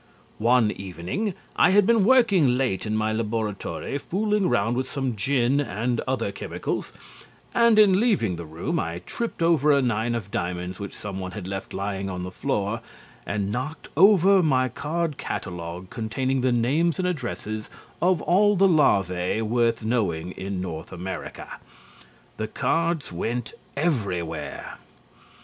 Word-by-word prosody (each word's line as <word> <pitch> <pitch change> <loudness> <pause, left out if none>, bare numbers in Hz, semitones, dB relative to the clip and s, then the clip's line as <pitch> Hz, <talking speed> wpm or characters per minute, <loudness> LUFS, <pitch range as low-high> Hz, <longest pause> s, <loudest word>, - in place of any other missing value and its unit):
One 115 -1 +4
evening 95 - -4 0.2
I - - +5
had 200 +1 +5
been 230 -1 +4
working 200 - +4
late 120 -7 -1
in 110 0 0
my 110 0 0
laboratory 110 +4 -3
fooling 210 +3 0
round 110 +4 +1
with 130 +1 -2
some 135 -4 -2
gin 130 +5 +2
and 120 -3 -1
other 130 -6 -1
chemicals, 100 - -4 0.6
and 235 -2 +5
in 200 -3 +6
leaving 195 - +2
the 85 -1 -7
room 80 +2 -2
I 85 +2 -4
tripped 230 -7 -3
over 155 -3 +4
a 140 - +5
nine 120 -2 0
of 100 -4 -5
diamonds 90 +1 -3
which 100 -2 -7
someone 95 -2 -5
had 100 -4 -6
left 95 0 -5
lying 100 0 -3
on 90 -1 -4
the 90 - -5
floor 105 +4 -2 0.5
and 100 +1 -1
knocked 130 +8 -4
over 195 +2 +6
my 130 -5 +2
card 155 +4 -2
catalogue 90 0 -5
containing 130 +4 -1
the 130 0 +2
names 140 +8 +2
and 185 -1 0
addresses 120 -9 -4 0.3
of 180 -2 +2
all 205 +3 +4
the 195 +1 +5
larvae 95 - +2
worth 115 0 +1
knowing 95 -8 0
in 95 0 -4
North 85 -2 -5
America. 90 +2 -6 0.8
The 110 - -2
cards 165 +6 0
went 115 +7 -3 0.2
everywhere. 100 - -2
120 Hz, 145 wpm, -25 LUFS, 95-160 Hz, 0.8 s, in